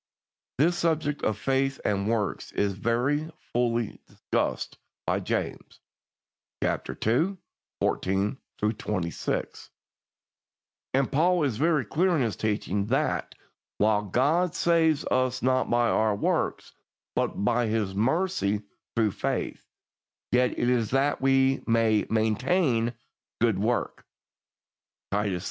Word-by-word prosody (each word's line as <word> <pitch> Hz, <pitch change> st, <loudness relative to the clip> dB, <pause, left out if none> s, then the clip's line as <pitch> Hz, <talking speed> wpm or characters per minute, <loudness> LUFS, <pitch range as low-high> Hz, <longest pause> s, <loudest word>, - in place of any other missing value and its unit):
This 170 Hz, +7 st, +3 dB
subject 155 Hz, -4 st, 0 dB
of 110 Hz, -, 0 dB
faith 135 Hz, +3 st, 0 dB
and 100 Hz, 0 st, 0 dB
works 110 Hz, -5 st, -1 dB
is 100 Hz, -1 st, +1 dB
very 125 Hz, -, 0 dB, 0.2 s
fully 120 Hz, -2 st, 0 dB
discussed -, -, -2 dB, 0.3 s
by -, -, +1 dB
James -, -, -4 dB, 0.8 s
(chap. -, -, -1 dB, 0.2 s
ii. 160 Hz, -, +2 dB, 0.4 s
14 95 Hz, +4 st, 0 dB, 0.2 s
26), 105 Hz, -5 st, -2 dB, 1.3 s
and 135 Hz, 0 st, +1 dB
Paul 170 Hz, +3 st, +3 dB
is 130 Hz, -7 st, 0 dB
very 155 Hz, -2 st, +2 dB
clear 175 Hz, -, +2 dB
in 140 Hz, -, +2 dB
his 115 Hz, -4 st, -1 dB
teaching 105 Hz, -2 st, -1 dB
that, 135 Hz, +6 st, 0 dB, 0.4 s
while 105 Hz, 0 st, +3 dB
God 150 Hz, -, +1 dB
saves 165 Hz, -4 st, +3 dB
us 130 Hz, 0 st, 0 dB
not 130 Hz, 0 st, +2 dB
by 120 Hz, 0 st, +3 dB
our 110 Hz, -1 st, +2 dB
works, -, -, -1 dB, 0.4 s
but 100 Hz, -, -1 dB
by 120 Hz, +1 st, +2 dB
His 105 Hz, -3 st, -1 dB
mercy 115 Hz, -, 0 dB, 0.3 s
through 110 Hz, -3 st, +2 dB
faith, -, -, -3 dB, 0.7 s
yet 125 Hz, +1 st, +2 dB
it 120 Hz, -, +1 dB
is 120 Hz, -4 st, +2 dB
that 135 Hz, +2 st, +1 dB
we 135 Hz, 0 st, +3 dB
may 115 Hz, -2 st, +3 dB
"maintain 120 Hz, -, +1 dB, 0.5 s
good 115 Hz, -5 st, +2 dB
work" 115 Hz, +4 st, -1 dB, 1.1 s
(Titus 100 Hz, -1 st, 0 dB
iii. 90 Hz, -, -2 dB
120 Hz, 120 wpm, -27 LUFS, 105-145 Hz, 1.3 s, This